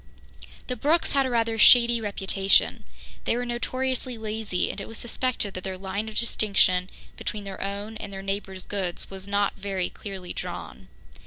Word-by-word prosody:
The 250 - -3
Brookes 305 +8 +2
had 275 -1 +3
a - - -2
rather 230 -2 +1
shady 235 0 +7
reputation. 195 -1 +2 0.4
They 235 - +2
were 245 - -1
notoriously 255 +1 -2
lazy, 215 -3 -1
and 200 - -6
it - - -6
was 225 - -8
suspected 240 -4 -1
that 185 - -5
their 190 -1 -4
line 200 +3 -3
of 215 - -8
distinction 195 -5 +2 0.3
between 210 -1 -4
their 195 -1 -7
own 200 +3 -4
and 205 -2 -7
their 195 0 -6
neighbours' 195 -1 -3
goods 190 -3 -3
was 190 0 -8
not 200 0 +1
very 195 -2 -2
clearly 190 -3 -7
drawn. - - -6
205 Hz, 170 wpm, -26 LUFS, 195-235 Hz, 0.4 s, shady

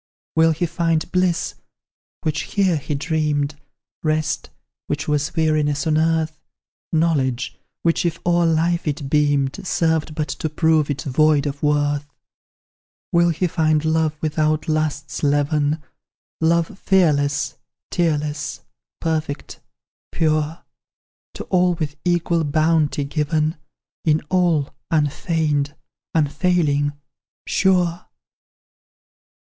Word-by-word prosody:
"Will 160 0 +5
he 160 +2 0
find 165 0 0
bliss, 180 -2 +1 0.7
which 155 -1 0
here 190 -5 +3
he 145 +1 -3
dreamed? 150 -1 0 0.5
Rest, 155 -1 -1 0.4
which 145 +1 -2
was 150 +2 0
weariness 155 -2 +1
on 155 -1 +2
earth? 160 -1 +1 0.5
Knowledge, 150 -7 +1 0.3
which, 165 +1 +2
if 170 -1 0
o'er 175 -1 +3
life 165 +1 +1
it 145 -2 -3
beamed, 145 -2 +2
Served 160 -4 0
but 150 -1 -1
to 155 - -3
prove 155 -1 +2
it 145 -1 -2
void 150 +1 +3
of 145 0 -4
worth? 145 -1 +1 1.0
"Will 170 0 +4
he 170 +2 0
find 155 -2 +1
love 160 -1 +1
without 155 0 0
lust's 155 -2 -1
leaven, 145 +1 +1 0.6
Love 170 +3 +1
fearless, 145 -6 +2 0.4
tearless, 150 -3 -1 0.4
perfect, 155 -3 -3 0.5
pure, 155 0 0 0.7
To - - -5
all 180 -1 +3
with 155 -3 -3
equal 170 -1 +1
bounty 155 -1 +2
given; 155 +2 0 0.5
In 155 -1 +3
all, 170 -6 +2 0.2
unfeigned, 150 -1 0 0.4
unfailing, 150 -2 +2 0.5
sure? 180 -3 +1
155 Hz, 105 wpm, -21 LUFS, 145-165 Hz, 1.0 s, Will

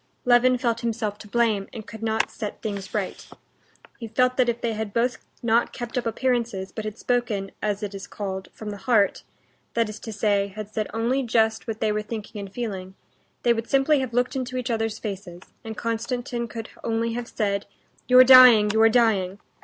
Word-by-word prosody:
Levin 250 +1 +5
felt 235 -2 0
himself 220 -3 -2
to 210 - -11
blame, 215 -3 +1
and 220 -3 -8
could 220 -1 -10
not 220 -1 0
set 210 -3 -6
things 200 -3 -4
right. 205 -3 -4 0.7
He 230 - -6
felt 250 +3 +2
that 250 -2 +3
if 235 0 -1
they 230 -1 -1
had 215 -2 -5
both 245 +2 +1 0.2
not 235 0 +2
kept 240 0 -6
up 250 -2 -1
appearances, 230 -5 -1
but 220 - -6
had 215 0 -5
spoken, 230 -6 -1
as 210 0 -1
it 205 -1 -4
is 195 0 -7
called, 190 -2 -5
from 215 -1 -7
the 205 - -6
heart—that 225 +1 -1
is 210 0 -8
to 225 - -7
say, 205 -1 +1
had 210 +1 -8
said 215 -1 -1
only 235 +4 0
just 220 -3 +1
what 220 -1 -4
they 215 -1 +2
were 210 0 -1
thinking 210 -1 -7
and 200 -1 -7
feeling—they 200 +2 -4
would 230 0 -4
simply 275 +2 +3
have 260 -3 -3
looked 245 +3 0
into 255 -1 -3
each 250 0 -2
other's 225 -1 -1
faces, 195 -5 -6 0.2
and 220 -1 -7
Konstantin 235 +1 -3
could 225 0 -7
only 230 0 -1
have 240 0 -4
said, 200 -4 -2 0.4
"You're 250 +1 +8
dying, 250 -5 +9
you're 220 +1 +5
dying!" 210 -5 +2
225 Hz, 195 wpm, -24 LUFS, 210-240 Hz, 0.7 s, dying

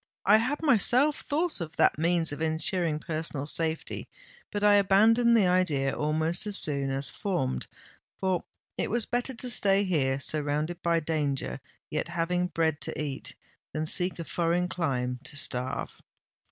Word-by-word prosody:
"I 210 +2 +7
had 255 +8 -1
myself 275 +2 +4
thought 310 - -1
of 160 -2 -6
that - - +3
means 165 -1 +1
of 145 - -6
ensuring 160 0 0
personal 155 -2 -4
safety: 160 +1 -2 0.4
but 205 -1 -3
I 210 0 +6
abandoned 220 +4 +5
the 205 - +4
idea 165 -7 +2
almost 160 +5 -1
as 205 -1 0
soon 140 -2 -1
as 135 +1 -1
formed—for 180 - -4 0.4
it - - 0
was 235 +1 +1
better 245 +2 -2
to 250 +2 -1
stay 200 -3 +3
here, 140 -8 +1
surrounded 150 +3 0
by 170 -1 +1
danger, 150 -4 -2 0.3
yet 150 - -2
having 175 +1 -1
bread 160 -3 -1
to - - -3
eat, 145 -3 -3 0.4
than 155 0 -2
seek 180 +3 +1
a 170 - -4
foreign 175 +2 0
clime 125 -8 -2
to 145 - -4
starve!" 125 -2 -2
165 Hz, 155 wpm, -28 LUFS, 150-200 Hz, 0.4 s, I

